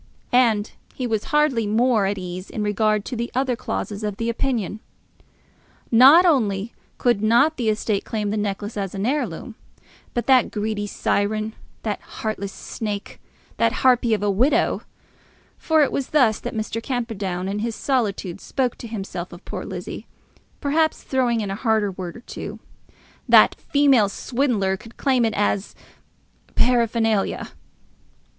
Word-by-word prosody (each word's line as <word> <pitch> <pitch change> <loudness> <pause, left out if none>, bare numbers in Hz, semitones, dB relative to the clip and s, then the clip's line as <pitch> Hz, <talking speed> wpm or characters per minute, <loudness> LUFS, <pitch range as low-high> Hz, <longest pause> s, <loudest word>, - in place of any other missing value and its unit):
And 230 -4 +3 0.2
he 255 - -3
was 220 -3 -1
hardly 270 -6 +2
more 220 -1 +3
at 200 +1 -1
ease 185 0 -6
in 215 - -3
regard 210 0 +1
to 255 - -4
the 235 +1 -3
other 260 -1 +1
clauses 215 -3 -4
of 210 -2 -3
the 230 0 -1
opinion. 230 -4 -1 1.1
Not 270 +10 +8
only 225 - +1 0.2
could 240 -5 +2
not 240 +9 +4
the 235 -4 0
estate 215 -1 0
claim 210 -2 -2
the - - -1
necklace 205 +1 -3
as 195 -1 -3
an 195 +1 -2
heirloom, 245 - -2 0.6
but 240 - -1
that 260 -3 +5
greedy 210 -1 -2
siren, 215 +2 -1 0.3
that 210 -2 -2
heartless 210 -3 -5
snake, 210 -2 -6 0.4
that 230 0 +3
harpy 245 -3 +4
of 205 - -4
a 205 - +2
widow, 250 +10 +2 0.8
for 315 -2 +3
it 280 - 0
was 275 - -2
thus 245 -8 +3
that - - -6
Mr. 220 +1 -3
Camperdown 210 -8 -3
in 200 +2 -2
his 225 +1 -2
solitude 210 -9 -1
spoke 255 -3 -2
to 235 - -7
himself 195 -5 -5
of 175 +2 -12
poor - - -5
Lizzie, - - -7 0.5
perhaps 315 +2 +1
throwing 245 -4 +1
in 200 -2 -3
a - - -1
harder 220 -2 +1
word 180 0 -7
or - - -12
two, - - -7 0.7
that - - +7
female 275 -8 +3
swindler 215 -5 0
could 225 +4 -15
claim 260 -4 +2
it 220 - 0
as 205 -1 0 0.8
paraphernalia! 230 -4 +1
220 Hz, 150 wpm, -22 LUFS, 205-250 Hz, 1.1 s, Not